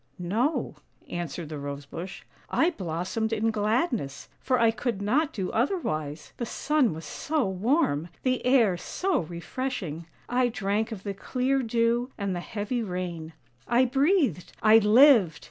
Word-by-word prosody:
" - - -40
"No," 220 - -1 0.3
answered 170 -2 -4
the 155 -2 -5
Rose 140 0 -6
bush; 180 +6 -7 0.2
" - - -30
I 345 - +3
blossomed 185 - -3
in 225 0 +1
gladness, 215 - -1
for 255 -2 +1
I 230 -1 +5
could 225 -1 -3
not 275 +10 +1
do 190 -8 -3
otherwise. 155 - -2
The 240 - -2
sun 275 - +1
was 160 - -8
so 300 -7 -1
warm, 190 - +1 0.2
the 255 -1 0
air 235 -8 +4
so 370 - -1
refreshing; 170 - -5 0.2
I 250 0 +2
drank 220 0 -1
of 200 -4 -6
the 200 - -3
clear 260 +6 0
dew 235 +1 +1
and 200 -3 -2
the - - -2
heavy 210 +6 -3
rain; 180 -5 -4 0.3
I 240 +2 +4
breathed 270 - +1
— - - -20
I 220 +1 +8
lived! 215 - +6
220 Hz, 160 wpm, -27 LUFS, 175-255 Hz, 0.3 s, I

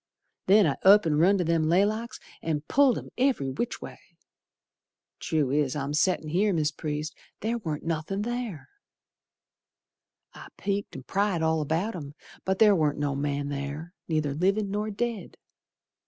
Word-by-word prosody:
Then 200 +1 +6
I 145 - 0
up 200 +1 +7
and 150 -2 +2
run 190 +5 +5
to 180 - +1
them 165 -1 +1
laylocks 215 +7 +1 0.2
An' 155 -3 -1
pulled 265 - +3
'em - - -7
every 250 - +1
which 240 - -3
way. - - -9 1.2
True 150 -5 0
es 145 -2 +1
I'm 140 0 -3
settin' 160 0 +1
here, 195 +5 +2
Mis' 155 -2 +1
Priest, 155 -1 -4 0.3
Ther 230 +2 -1
warn't 155 -8 -4
nothin' 165 +5 -2
ther. 240 -8 -4 1.7
I - - -11
peeked 200 0 -3
an' 135 - -7
pryed 195 0 0
all 160 0 +2
about 165 +9 -1
'em, 145 -4 -8 0.3
But 190 0 0
ther 210 -1 +6
warn't 150 -4 +1
no 145 -1 -1
man 140 0 -2
ther 145 +5 -5
Neither 155 -3 0
livin' 195 +6 +1
nor 210 +1 -1
dead. 220 -2 -4
165 Hz, 155 wpm, -27 LUFS, 150-205 Hz, 1.7 s, up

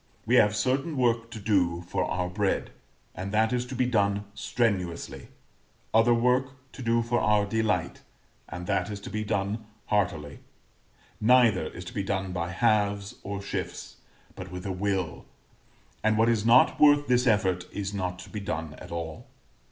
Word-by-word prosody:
We 115 - 0
have 105 -2 +5
certain 135 +7 0
work 115 -2 +1
to 115 -1 -8
do 90 -5 +1
for - - -1
our 90 0 -1
bread, 100 +2 -1 0.4
and 95 +2 -5
that 110 +2 +2
is 125 0 -1
to 130 - -6
be 125 0 +2
done 100 -4 +1
strenuously; 95 -10 -2 0.7
other 115 +2 +5
work 125 +3 +2 0.2
to - - -10
do 115 -1 +2
for 120 +1 0
our 105 -1 +3
delight, 105 -4 -1 0.5
and 90 0 -6
that - - 0
is 100 -1 -5
to - - -8
be 110 0 -2
done 100 +2 -2 0.2
heartily: 80 -8 -1 0.8
neither 115 -3 +4
is 90 - -9
to - - -8
be 100 - -1
done 95 -1 -2
by 85 -1 -3
halves 100 -1 0
or 100 0 -5
shifts, - - -5 0.4
but 95 -1 -8
with 90 +2 -7
a 100 - -2
will; 95 -2 -2 0.8
and 110 0 +3
what 115 +1 +4
is 115 -1 +1
not 120 +3 +5
worth 145 -1 +6
this 125 0 +2
effort 95 -5 +2
is 100 0 -4
not 90 -2 -3
to 90 - -11
be 105 - -4
done 80 -5 -4
at - - -11
all. 80 -2 -6
105 Hz, 175 wpm, -27 LUFS, 95-115 Hz, 0.8 s, worth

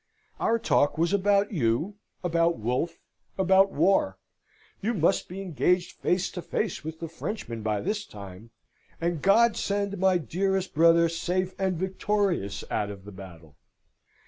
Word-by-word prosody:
Our 230 - +2
talk 145 -10 +2
was 170 +3 +1
about 200 +1 +2
you, 160 - 0 0.3
about 170 -1 +2
Wolfe, 125 +10 -2 0.4
about 190 +1 +4
war; 140 - +2 0.6
you 225 +4 0
must 185 +2 +1
be 190 +2 -6
engaged 180 +1 +1
face 180 +1 +1
to 180 - -6
face 210 +2 -3
with 160 +1 -6
the 165 - -4
Frenchmen 165 - -5
by 105 -1 -1
this 210 +2 -2
time, 100 +1 -11 0.5
and 170 -2 -1
God 225 +4 +5
send 200 -1 -2
my 190 -1 +4
dearest 190 - -1
brother 165 +1 +5
safe 180 +3 -2
and 190 -2 0
victorious 190 - -1
out 105 - -1
of 100 -1 -9
the 105 - -9
battle! 85 -6 -12
175 Hz, 145 wpm, -27 LUFS, 130-195 Hz, 0.6 s, God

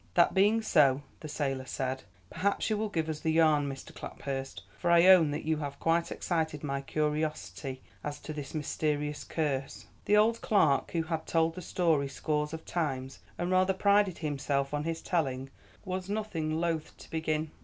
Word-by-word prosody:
"That 170 - +5
being 210 +4 +4
so," 145 -8 +4 0.2
the 155 - -7
sailor 135 -3 -2
said, 130 0 -2 0.3
"perhaps 200 +3 0
you 215 - +2
will 215 0 -1
give 160 -5 -1
us 155 -1 -3
the 160 - 0
yarn, 155 -3 +4
Mr. 135 -1 -8
Claphurst, 135 -1 -6
for 175 - -1
I 170 0 +6
own 185 -5 +8
that 150 +2 -4
you 160 0 +1
have 140 -2 -5
quite 165 +1 +1
excited 160 -4 -2
my 140 -1 -2
curiosity 140 - -2 0.2
as 145 0 -4
to 155 - -6
this 145 0 -7
mysterious 150 0 -1
curse." 140 -4 -2 0.2
The 210 - +4
old 225 +2 +3
clerk, 150 -11 +3
who 165 -1 -1
had 160 -1 -3
told 165 0 +2
the 185 - -7
story 160 -5 +1
scores 150 +2 -1
of 160 0 -7
times, 135 -6 -2 0.2
and 175 +1 -1
rather 185 +1 +3
prided 200 -1 +3
himself 140 -2 -1
on 145 +1 -1
his 165 0 -3
telling, 135 -6 -1 0.3
was 185 0 -4
nothing 165 -7 -2
loth 165 -2 -2
to - - -14
begin. 155 -1 -1
155 Hz, 180 wpm, -30 LUFS, 140-170 Hz, 0.3 s, own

